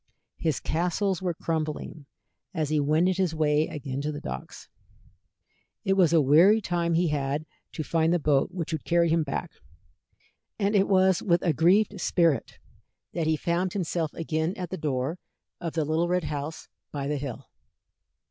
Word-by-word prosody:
His 160 Hz, -5 st, 0 dB
castles 180 Hz, +4 st, -1 dB
were 180 Hz, -3 st, -1 dB
crumbling 155 Hz, -2 st, -4 dB, 0.5 s
as 155 Hz, -3 st, -1 dB
he 155 Hz, -1 st, +2 dB
wended 160 Hz, +6 st, +2 dB
his 180 Hz, -4 st, 0 dB
way 155 Hz, 0 st, +2 dB
again 140 Hz, -2 st, -5 dB
to 150 Hz, +1 st, -2 dB
the 145 Hz, -, -5 dB
docks. -, -, -7 dB, 1.2 s
It 195 Hz, -, +3 dB
was 185 Hz, -4 st, +4 dB
a 165 Hz, -, +5 dB
weary 165 Hz, +10 st, +6 dB
time 170 Hz, -4 st, 0 dB
he 170 Hz, 0 st, +2 dB
had 145 Hz, +1 st, -1 dB, 0.3 s
to 155 Hz, -, -3 dB
find 165 Hz, +2 st, +1 dB
the 175 Hz, -, +3 dB
boat 145 Hz, -4 st, +2 dB
which 170 Hz, -3 st, -4 dB
would 155 Hz, -, -3 dB
carry 170 Hz, -1 st, +2 dB
him 165 Hz, +1 st, +3 dB
back, 140 Hz, -3 st, -3 dB, 1.1 s
and 205 Hz, 0 st, +1 dB
it 195 Hz, -1 st, +4 dB
was 190 Hz, -2 st, +4 dB
with 170 Hz, -2 st, +2 dB
a 170 Hz, -, +2 dB
grieved 190 Hz, +5 st, +3 dB
spirit 165 Hz, -8 st, +1 dB, 0.6 s
that 165 Hz, -3 st, -1 dB
he 160 Hz, 0 st, +2 dB
found 175 Hz, +3 st, -1 dB
himself 170 Hz, -4 st, -1 dB
again 160 Hz, +2 st, -1 dB
at 180 Hz, -2 st, -5 dB
the -, -, -2 dB
door 150 Hz, 0 st, -2 dB, 0.4 s
of 170 Hz, -2 st, -4 dB
the 160 Hz, -2 st, 0 dB
little 160 Hz, +3 st, +1 dB
red 180 Hz, 0 st, +1 dB
house 150 Hz, +1 st, -5 dB, 0.2 s
by 140 Hz, -2 st, -4 dB
the 145 Hz, +1 st, -1 dB
hill. 135 Hz, -4 st, -6 dB
165 Hz, 170 wpm, -27 LUFS, 150-180 Hz, 1.2 s, weary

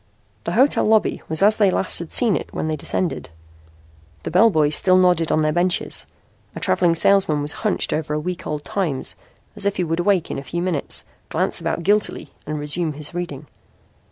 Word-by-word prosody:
The -, -, -2 dB
hotel 270 Hz, +3 st, +3 dB
lobby 220 Hz, 0 st, +2 dB
was 160 Hz, +4 st, +3 dB
as 215 Hz, +2 st, +5 dB
they 205 Hz, -3 st, +4 dB
last 185 Hz, -, +1 dB
had 170 Hz, -2 st, -7 dB
seen 230 Hz, -6 st, +2 dB
it -, -, -5 dB
when -, -, -3 dB
they 155 Hz, -, -1 dB
descended. 165 Hz, -, -2 dB, 0.9 s
The -, -, -4 dB
bellboys 175 Hz, -7 st, +4 dB
still 185 Hz, -1 st, +4 dB
nodded 180 Hz, -3 st, +3 dB
on 155 Hz, -, +2 dB
their 155 Hz, -, +2 dB
benches. 175 Hz, +2 st, 0 dB, 0.5 s
A -, -, -5 dB
travelling 165 Hz, -, +2 dB
salesman 180 Hz, -3 st, +3 dB
was 145 Hz, +1 st, -1 dB
hunched 215 Hz, -3 st, 0 dB
over 155 Hz, -1 st, -2 dB
a -, -, -1 dB
week 180 Hz, +3 st, -5 dB
old 150 Hz, -1 st, -4 dB
Times 165 Hz, -10 st, -3 dB, 0.4 s
as -, -, -3 dB
if 200 Hz, -, 0 dB
he 180 Hz, -, -1 dB
would 165 Hz, 0 st, -2 dB
awake 180 Hz, -2 st, +1 dB
in -, -, -3 dB
a -, -, -9 dB
few 175 Hz, +4 st, -4 dB
minutes, 175 Hz, -6 st, -2 dB, 0.2 s
glance -, -, -1 dB
about 170 Hz, -, -2 dB
guiltily 210 Hz, +3 st, 0 dB
and 155 Hz, 0 st, -3 dB
resume 150 Hz, +2 st, -2 dB
his 150 Hz, +3 st, -4 dB
reading. 165 Hz, -5 st, -5 dB
175 Hz, 195 wpm, -21 LUFS, 155-190 Hz, 0.9 s, as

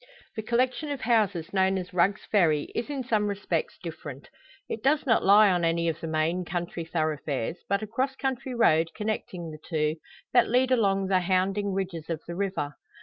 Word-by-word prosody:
The 220 Hz, -, -3 dB
collection 255 Hz, +6 st, 0 dB
of 285 Hz, -3 st, -4 dB
houses 200 Hz, -7 st, +1 dB
known 190 Hz, 0 st, +3 dB
as 180 Hz, -1 st, -6 dB
Rugg's 185 Hz, +3 st, +2 dB
Ferry 160 Hz, -8 st, +2 dB
is 235 Hz, -, -3 dB
in 280 Hz, -3 st, -3 dB
some 215 Hz, -4 st, +1 dB
respects 195 Hz, -5 st, -2 dB
different. 145 Hz, -5 st, -8 dB, 0.4 s
It 220 Hz, -, -4 dB
does 290 Hz, +4 st, +2 dB
not 230 Hz, -4 st, +3 dB
lie 205 Hz, +1 st, +7 dB
on 175 Hz, -1 st, +1 dB
any 170 Hz, 0 st, +1 dB
of 160 Hz, -, -3 dB
the 165 Hz, -, -4 dB
main 160 Hz, +3 st, 0 dB
county 175 Hz, -1 st, -4 dB
thoroughfares, 155 Hz, -3 st, -2 dB
but 200 Hz, +2 st, +1 dB
a -, -, -4 dB
cross 260 Hz, +5 st, -1 dB
country 265 Hz, -1 st, -3 dB
road 165 Hz, -8 st, +4 dB
connecting 200 Hz, -6 st, -4 dB
the 155 Hz, -, -10 dB
two, 155 Hz, -1 st, -1 dB, 0.4 s
that 245 Hz, -1 st, +5 dB
lead 255 Hz, +2 st, +3 dB
along 195 Hz, -5 st, +2 dB
the 190 Hz, -1 st, +3 dB
hounding 190 Hz, +2 st, +1 dB
ridges 185 Hz, -4 st, -4 dB
of 165 Hz, -2 st, -2 dB
the 170 Hz, -, -6 dB
river. 180 Hz, -7 st, -2 dB
190 Hz, 190 wpm, -27 LUFS, 165-220 Hz, 0.4 s, lie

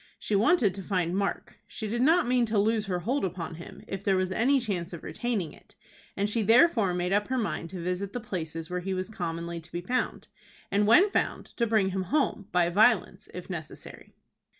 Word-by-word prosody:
She 210 Hz, -, -2 dB
wanted 220 Hz, -, +3 dB
to 195 Hz, -, -7 dB
find 180 Hz, -2 st, -1 dB
Mark. 200 Hz, 0 st, -3 dB
She 220 Hz, -, -5 dB
did 235 Hz, +3 st, -1 dB
not 330 Hz, +6 st, +4 dB
mean 245 Hz, -1 st, +2 dB
to 215 Hz, 0 st, 0 dB
lose 215 Hz, +1 st, +2 dB
her 180 Hz, -2 st, -2 dB
hold 260 Hz, +9 st, -1 dB
upon 180 Hz, -2 st, -3 dB
him, -, -, -11 dB
if 195 Hz, 0 st, -5 dB
there 195 Hz, -2 st, +2 dB
was 185 Hz, 0 st, 0 dB
any 260 Hz, +8 st, +3 dB
chance 185 Hz, -7 st, -3 dB
of 170 Hz, -, -8 dB
retaining 225 Hz, -10 st, -3 dB
it, -, -, -20 dB, 0.4 s
and 200 Hz, +1 st, +1 dB
she 220 Hz, +2 st, 0 dB
therefore 225 Hz, -, +4 dB
made 180 Hz, +1 st, -1 dB
up 205 Hz, +1 st, +1 dB
her 260 Hz, -, -1 dB
mind 205 Hz, -7 st, -2 dB
to 180 Hz, -1 st, -6 dB
visit 180 Hz, +2 st, -2 dB
the 245 Hz, -, -4 dB
places 165 Hz, -7 st, -5 dB
where 180 Hz, +1 st, -3 dB
he 190 Hz, +1 st, -3 dB
was 185 Hz, +3 st, -4 dB
commonly 170 Hz, -3 st, -4 dB
to 165 Hz, 0 st, -14 dB
be 175 Hz, -, -4 dB
found, 250 Hz, +8 st, -2 dB, 0.4 s
and, 205 Hz, +1 st, +2 dB
when 370 Hz, -, +6 dB
found, -, -, -1 dB
to 235 Hz, -, +1 dB
bring 210 Hz, -3 st, +2 dB
him 190 Hz, 0 st, -2 dB
home, 215 Hz, -, 0 dB
by 175 Hz, -1 st, +3 dB
violence, 210 Hz, 0 st, +2 dB
if 180 Hz, 0 st, -8 dB
necessary. 170 Hz, -5 st, -9 dB
195 Hz, 215 wpm, -28 LUFS, 180-225 Hz, 0.4 s, when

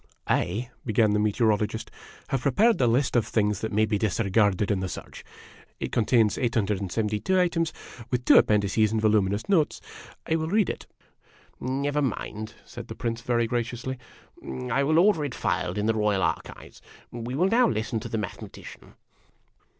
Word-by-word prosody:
" -, -, -49 dB
I," 115 Hz, +8 st, -1 dB
began 110 Hz, -2 st, +2 dB
the 105 Hz, -, +2 dB
Meteorologist, 105 Hz, 0 st, 0 dB, 0.4 s
"have 135 Hz, -, 0 dB
prepared 205 Hz, -, +3 dB
a 125 Hz, -, +4 dB
list 125 Hz, +3 st, +1 dB
of 115 Hz, -2 st, +3 dB
the -, -, -10 dB
things 105 Hz, -3 st, +1 dB
that 110 Hz, -, -3 dB
may 110 Hz, +2 st, +3 dB
be 105 Hz, -2 st, -1 dB
disregarded 105 Hz, -1 st, +1 dB
in 100 Hz, -, +1 dB
the 95 Hz, -1 st, -3 dB
search. -, -, -9 dB, 0.6 s
It -, -, -4 dB
contains 115 Hz, -2 st, +2 dB
872 105 Hz, -, 0 dB
items, 170 Hz, -2 st, +1 dB, 0.4 s
with 125 Hz, -1 st, -1 dB
two -, -, +8 dB
appendices 105 Hz, +1 st, +2 dB
and 110 Hz, -, 0 dB
voluminous 105 Hz, -1 st, +1 dB
notes. 175 Hz, -7 st, +2 dB, 0.5 s
I 160 Hz, -, +1 dB
will 160 Hz, 0 st, -2 dB
read 205 Hz, +3 st, +2 dB
it." -, -, -10 dB, 0.5 s
" -, -, -30 dB
Never 140 Hz, +3 st, -1 dB
mind," 110 Hz, -4 st, -4 dB
said 120 Hz, -1 st, -9 dB
the 110 Hz, -, -7 dB
Prince, 115 Hz, -1 st, -3 dB
very 120 Hz, -1 st, +1 dB
graciously. 120 Hz, +2 st, -3 dB, 0.4 s
" 65 Hz, -1 st, -6 dB
I 140 Hz, -, +2 dB
will 155 Hz, +3 st, +2 dB
order 175 Hz, -3 st, +4 dB
it 140 Hz, -4 st, -4 dB
filed -, -, -1 dB
in 105 Hz, -, 0 dB
the 115 Hz, -, +2 dB
Royal 105 Hz, -3 st, +1 dB
Archives. -, -, -4 dB, 0.3 s
We 120 Hz, +2 st, -5 dB
will 180 Hz, +6 st, +2 dB
now 240 Hz, +3 st, +4 dB
listen 110 Hz, +1 st, -2 dB
to 115 Hz, +1 st, -7 dB
the 115 Hz, -, -2 dB
Mathe 100 Hz, -4 st, -4 dB
matician." -, -, -12 dB
115 Hz, 180 wpm, -26 LUFS, 105-130 Hz, 0.6 s, two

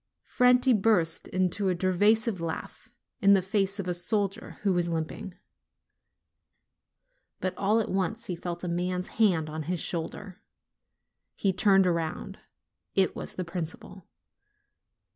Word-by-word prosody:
Franti 250 Hz, +1 st, +4 dB
burst 190 Hz, -6 st, +2 dB
into 185 Hz, +1 st, 0 dB
a 180 Hz, -, +1 dB
derisive 205 Hz, +3 st, +2 dB
laugh, 165 Hz, -1 st, -6 dB, 0.3 s
in 200 Hz, -1 st, +6 dB
the 195 Hz, -, +5 dB
face 195 Hz, 0 st, 0 dB
of 190 Hz, -, -3 dB
a 180 Hz, -, 0 dB
soldier 195 Hz, +3 st, -1 dB
who 195 Hz, -2 st, +2 dB
was 175 Hz, -1 st, 0 dB
limping. 165 Hz, +3 st, -4 dB, 2.0 s
But 185 Hz, -, -2 dB
all 210 Hz, +3 st, +2 dB
at 220 Hz, -, -1 dB
once 205 Hz, +5 st, -1 dB
he 180 Hz, -, -3 dB
felt 175 Hz, +1 st, -6 dB
a -, -, -2 dB
man's 180 Hz, +1 st, -2 dB
hand 175 Hz, -8 st, +3 dB
on 155 Hz, +1 st, -5 dB
his 180 Hz, -1 st, -1 dB
shoulder: 180 Hz, +4 st, -4 dB, 0.9 s
he 195 Hz, -2 st, +1 dB
turned 195 Hz, +1 st, +5 dB
round; 170 Hz, -3 st, -2 dB, 0.6 s
it 190 Hz, -1 st, +3 dB
was -, -, -5 dB
the 185 Hz, -, -3 dB
principal. 175 Hz, +1 st, -7 dB
185 Hz, 135 wpm, -28 LUFS, 175-200 Hz, 2.0 s, in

